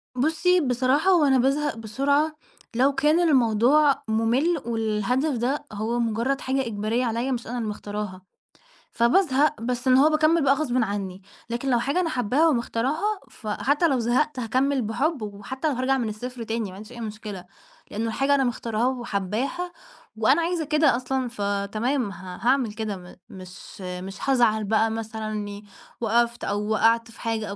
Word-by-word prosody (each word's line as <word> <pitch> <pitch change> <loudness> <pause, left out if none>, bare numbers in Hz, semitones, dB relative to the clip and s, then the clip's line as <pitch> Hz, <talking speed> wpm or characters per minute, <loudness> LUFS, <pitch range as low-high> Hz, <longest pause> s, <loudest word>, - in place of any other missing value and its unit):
بُصّي، 325 +7 +2
بصراحة 260 +6 +2
هو 335 -5 +5
أنا 265 -2 +4
بازهق 275 +1 +1
بسرعة 280 +8 0 0.4
لو 270 +4 +3
كان 300 +5 +3
الموضوع 275 -1 +4
مُمِل 245 +9 +1
والهدف 235 +5 0
ده 270 +5 -1
هو 225 +3 -2
مُجرّد 235 +4 0
حاجة 265 -1 -1
إجبارية 220 +3 -1
عليّا 235 +3 -1
مش 240 -3 -3
أنا 245 +1 -4
اللي 220 -3 -2
مختارها، 205 -2 -5 0.7
فبازهق 285 - +2
بس 250 +2 -2
إن 255 0 +6
هو 295 +3 +6
باكمِّل 310 +1 +3
بقى 275 0 +5
غصبٍ 275 -4 -1
عنّي، 195 -2 -4 0.3
لكن 240 +3 -2
لو 240 -2 +3
حاجة 280 +8 0
أنا 340 -3 0
حابّاها 255 +6 +2
ومختارها، 295 - 0
فحتّى 285 +9 0
لو 265 -4 +1
زهقت 255 +5 +1
هاكمِّل 260 +3 +1
بحُب، 255 +6 -1
وحتّى 215 +8 -4
لو 290 - +1
هارجع 260 +2 +1
من 230 -4 -1
الصفر 245 +3 -6
تاني 225 -2 -3
ما 185 - -10
عنديش 210 +4 -11
أي 240 - -9
مشكلة، 210 -4 -7 0.5
لإنّه 225 +2 -2
الحاجة 275 +5 +2
أنا 270 - +2
مختارها 235 -1 -1
وحابّاها 245 - -2 0.4
وأنا 260 +9 +3
عايزة 335 -1 -1
كده 300 -3 +3
أصلًا، 255 +1 -2
فتمام 205 +3 -1
ه 185 -2 -9
هاعمل 245 -3 +2
كده 215 -3 -4
م 180 0 -13
مش 185 0 -11
مش 185 +1 -6
هازعل 230 -5 +3
بقى 220 +2 +2
مثلًا 220 -1 -4
إنّي 205 -1 -5 0.4
وقفْت 235 +1 +1
أو 205 +1 -2
وقعْت 230 +2 +2
في - - -15
حاجة 225 -2 -2
أو 200 - -5
240 Hz, 165 wpm, -25 LUFS, 215-275 Hz, 0.7 s, إن